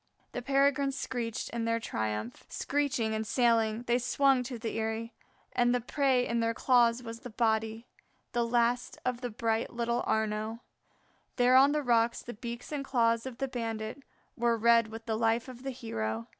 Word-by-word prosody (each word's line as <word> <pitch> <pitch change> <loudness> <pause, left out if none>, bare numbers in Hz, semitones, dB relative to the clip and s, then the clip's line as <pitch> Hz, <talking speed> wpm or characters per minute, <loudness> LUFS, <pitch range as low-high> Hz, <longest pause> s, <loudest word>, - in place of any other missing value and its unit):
The 245 - -4
Peregrines 275 +1 +2
screeched 235 -4 -3
in 235 -1 -2
their 230 0 +1
triumph. 110 - -3
Screeching 260 -6 -1
and 220 0 -2
sailing, 230 -2 +2
they 240 0 +2
swung 265 +1 +3
to 245 -1 -5
their 225 0 -4
eyrie, 225 +1 -3 0.4
and 245 0 +3
the - - +2
prey 255 0 +1
in 235 0 0
their 230 0 0
claws 245 -1 +3
was 230 0 -7
the 250 - -9
body, 220 0 0 0.5
the 240 -1 +1
last 240 +1 +1
of 250 -1 -1
the 245 - -3
bright 225 0 -1
little 235 0 -1
Arnaux. 220 +1 -1 0.7
There 250 0 +4
on 275 +2 +7
the 300 0 0
rocks 235 -2 +2
the 240 - -7
beaks 235 +4 -7
and 290 -2 -2
claws 230 -3 +1
of 250 -3 -7
the 270 - -1
bandits 225 0 -4 0.3
were 235 -1 +2
red 230 0 +5
with 225 +1 -9
the 220 - -1
life 230 +2 +1
of 250 -1 -10
the 270 - -4
hero. 115 - -3
235 Hz, 180 wpm, -30 LUFS, 225-250 Hz, 0.7 s, on